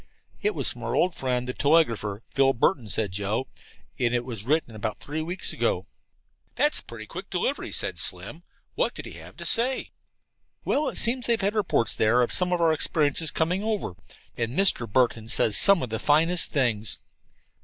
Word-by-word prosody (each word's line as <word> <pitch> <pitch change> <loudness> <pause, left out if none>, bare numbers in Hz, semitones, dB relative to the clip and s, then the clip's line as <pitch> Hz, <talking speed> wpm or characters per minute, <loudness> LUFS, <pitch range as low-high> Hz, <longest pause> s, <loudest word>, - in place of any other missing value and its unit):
"It 420 - 0
was - - -1
from - - -13
our - - -3
old 180 - +2
friend, 125 -3 -2
the 125 - -3
telegrapher, 115 -10 +1
Philip 135 -2 +2
Burton," 120 - +1
said 105 -1 -1
Joe, 105 +6 -2 0.5
"and 120 -1 +1
it 120 0 -1
was 115 -5 -6
written 150 -3 0
about 110 0 -4
three 155 +2 -5
weeks 175 +4 -2
ago." - - -1 0.7
"That's 295 0 +4
pretty 115 -2 -10
quick 185 - -9
delivery," 195 +10 -2
said - - -1
Slim. - - 0 0.3
"What - - -1
did - - -6
he - - -8
have - - -13
to - - -5
say?" 255 +3 +3 0.7
"Well, 295 +1 0
it - - -6
seems 245 +2 +2
they've 235 -1 +2
had 200 +1 0
reports 200 - 0
there 120 +3 +3
of 120 - -1
some 180 -1 +2
of 180 - +1
our 165 -1 +3
experiences 155 0 0
coming 180 +5 -1
over, 215 - -2 0.4
and 120 +3 -3
Mr. 180 - +2
Burton 115 -2 +1
says 110 -1 +3
some 200 -6 +5
of 125 - -5
the 110 - -3
finest 165 +4 +3
things." 110 -8 0
140 Hz, 185 wpm, -25 LUFS, 115-185 Hz, 0.7 s, some